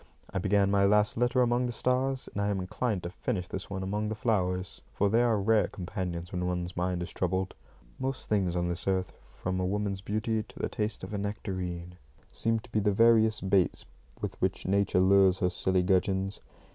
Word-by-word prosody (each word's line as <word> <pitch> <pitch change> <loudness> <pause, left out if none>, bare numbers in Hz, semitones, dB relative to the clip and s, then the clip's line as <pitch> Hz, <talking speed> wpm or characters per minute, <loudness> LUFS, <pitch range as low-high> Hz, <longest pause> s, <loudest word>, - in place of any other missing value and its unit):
I - - 0
began 100 +1 +2
my 100 -1 +4
last 105 +1 +3
letter 125 +2 +3
among 120 +1 +1
the - - -2
stars, 130 +2 0
and 100 - -2
I 100 - +1
am 100 -2 0
inclined 95 +2 -2
to 85 - -4
finish 95 -3 -3
this - - -5
one 95 -1 -4
among 105 +3 -1
the 110 - -2
flowers, 95 -5 -1
for 100 0 +1
they 115 +2 +4
are 115 -3 +3
rare 105 +1 +3
companions 90 -2 -5
when 90 -1 -2
one's 90 -1 -3
mind 90 0 -1
is 85 - -8
troubled. 95 +1 -1 0.5
Most 130 0 -3
things 95 -5 +1
on 85 0 0
this 85 +1 -3
earth, 95 -1 0 0.2
from 95 0 -2
a - - 0
woman's 100 0 -1
beauty 110 +2 -1
to 105 - -14
the - - -2
taste 110 -1 -3
of - - -6
a 100 - -1
nectarine, 90 -4 -4 0.3
seem 115 0 +1
to 115 - -17
be 110 - +2
the 105 0 +2
various 110 +1 +4
baits 95 -1 +2 0.3
with - - -5
which - - 0
Nature 100 -1 +2
lures 95 0 +5
her 90 -2 +1
silly 95 +1 +1
gudgeons. 95 +1 +1
100 Hz, 205 wpm, -29 LUFS, 90-110 Hz, 0.5 s, lures